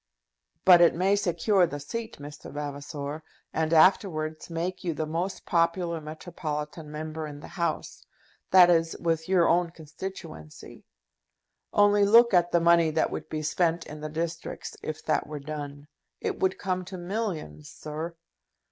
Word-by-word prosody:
"But 180 -2 +8
it 170 - +6
may 190 +4 +3
secure 185 0 +2
the 145 -2 -6
seat, 225 +10 -6
Mr. 145 +1 -10
Vavasor, 145 +1 -5 0.3
and 160 0 0
afterwards 160 -2 +3
make 175 +2 -3
you 170 -3 -2
the 155 - -2
most 170 +5 -3
popular 170 0 +1
metropolitan 155 -1 -6
Member 155 +1 -5
in 145 -1 -9
the - - -11
House; 170 -1 -3 0.5
that 180 -2 +8
is, 165 -1 +2
with 165 0 -1
your 180 -3 +4
own 175 0 +3
constituency. 160 - -9 0.9
Only 205 0 +4
look 230 +3 +6
at 175 -1 +4
the 170 - +4
money 170 -1 +5
that 155 +1 0
would - - -6
be 155 0 -3
spent 170 +2 0
in 150 0 -9
the 155 - -4
districts 165 +1 -5
if 155 0 -6
that 155 - +1
were 150 0 -6
done! 145 0 -7 0.3
It - - -3
would 190 0 +1
come 185 -2 -2
to 185 +1 -7
millions, 175 - -4
sir!" 155 +3 -6
165 Hz, 155 wpm, -27 LUFS, 155-180 Hz, 0.9 s, But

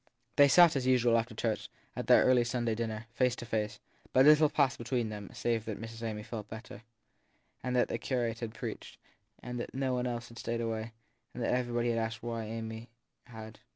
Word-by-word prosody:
They 145 - +7
sat 170 +2 +7
as 130 -2 0
usual, 125 -2 +4
after 115 0 0
church, 110 -1 -2 0.3
at - - -4
their - - +7
early 125 -1 +5
Sunday 120 -1 -1
dinner, 110 0 -3
face 125 0 +2
to 120 - -7
face; 105 -2 -2 0.3
but 130 +1 +6
little 150 0 +7
passed 140 -4 +1
between 120 -1 -1
them 105 -2 -7
save 115 -2 -1
that 110 -2 -4
Miss 115 0 -8
Amy 110 -2 -4
felt 110 -2 -7
better, 110 0 -9 0.8
that 125 -1 +2
the - - -3
curate 120 -3 -1
had 115 -2 -5
preached, - - -6 0.5
that 125 0 -5
nobody 130 -2 0
else 120 0 -5
had 115 - -11
stayed 115 0 -2
away, 115 0 -3 0.4
and 120 - -3
that - - +1
everybody 120 -1 0
had 115 -1 +1
asked 110 0 -3
why 115 -2 -3
Amy 110 +1 -6 0.4
had. 110 -2 -10
115 Hz, 190 wpm, -31 LUFS, 110-125 Hz, 0.8 s, They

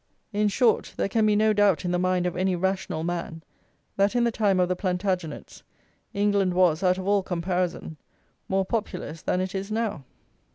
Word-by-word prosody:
In 210 +1 +2
short, 225 +3 +1
there - - 0
can 215 +1 +2
be 210 - +3
no 215 +1 +3
doubt 205 -4 +3
in 175 - 0
the 180 - +1
mind 185 0 +1
of 180 - -2
any 185 +1 +1
rational 185 -3 -2
man 170 -1 -4 0.5
that 200 +4 +2
in 240 - +3
the 235 - +2
time 205 -4 +1
of 180 - +3
the 180 - 0
Plantagenets 180 -3 -3 0.5
England 200 -3 +1
was, 180 -3 +3
out 185 -1 +2
of 190 0 -5
all 200 0 +3
comparison, 180 -2 -2 0.5
more 195 0 +1
populous 180 -7 -4
than 180 - 0
it 185 0 -2
is 195 +2 -4
now. 215 -8 -2
185 Hz, 190 wpm, -25 LUFS, 180-205 Hz, 0.5 s, be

